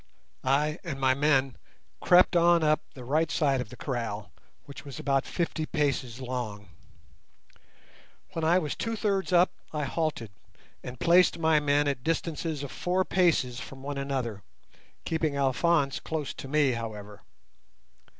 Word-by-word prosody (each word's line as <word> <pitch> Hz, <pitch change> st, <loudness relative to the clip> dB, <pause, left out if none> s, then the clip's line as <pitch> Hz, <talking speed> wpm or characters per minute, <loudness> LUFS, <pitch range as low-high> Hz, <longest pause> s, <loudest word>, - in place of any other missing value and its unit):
I 150 Hz, +4 st, +1 dB
and 155 Hz, -7 st, -5 dB
my 130 Hz, -1 st, +3 dB
men 135 Hz, -2 st, +2 dB, 0.4 s
crept 180 Hz, 0 st, +5 dB
on 170 Hz, -1 st, +5 dB
up 155 Hz, 0 st, +3 dB
the 130 Hz, -, -9 dB
right 155 Hz, +5 st, +1 dB
side 140 Hz, -4 st, +1 dB
of 110 Hz, -, -7 dB
the 125 Hz, -, -10 dB
kraal, 115 Hz, -6 st, -4 dB, 0.3 s
which 140 Hz, -, -10 dB
was 140 Hz, -4 st, -9 dB
about 135 Hz, -1 st, 0 dB
fifty 165 Hz, -2 st, -2 dB
paces 135 Hz, -6 st, -1 dB
long. 120 Hz, -6 st, -5 dB, 1.6 s
When 165 Hz, -, -4 dB
I 165 Hz, +3 st, +4 dB
was 155 Hz, -5 st, -2 dB
two 230 Hz, 0 st, -3 dB
thirds 200 Hz, -3 st, -1 dB
up 180 Hz, 0 st, +5 dB, 0.2 s
I 150 Hz, -1 st, -2 dB
halted, 145 Hz, -, -2 dB, 0.5 s
and 125 Hz, -1 st, -8 dB
placed 175 Hz, +1 st, +4 dB
my 160 Hz, -2 st, +3 dB
men 145 Hz, 0 st, +2 dB
at 140 Hz, -3 st, -2 dB
distances 160 Hz, -1 st, -2 dB
of 140 Hz, -, -6 dB
four 185 Hz, +1 st, 0 dB
paces 150 Hz, -10 st, +2 dB
from 135 Hz, +1 st, -10 dB
one 140 Hz, 0 st, -4 dB
another, 130 Hz, -7 st, -3 dB, 0.6 s
keeping 160 Hz, -3 st, -1 dB
Alphonse 140 Hz, +2 st, +2 dB
close 155 Hz, -3 st, -4 dB
to -, -, -8 dB
me, 145 Hz, -1 st, +3 dB
however. 105 Hz, -3 st, -6 dB
145 Hz, 150 wpm, -28 LUFS, 130-165 Hz, 1.6 s, crept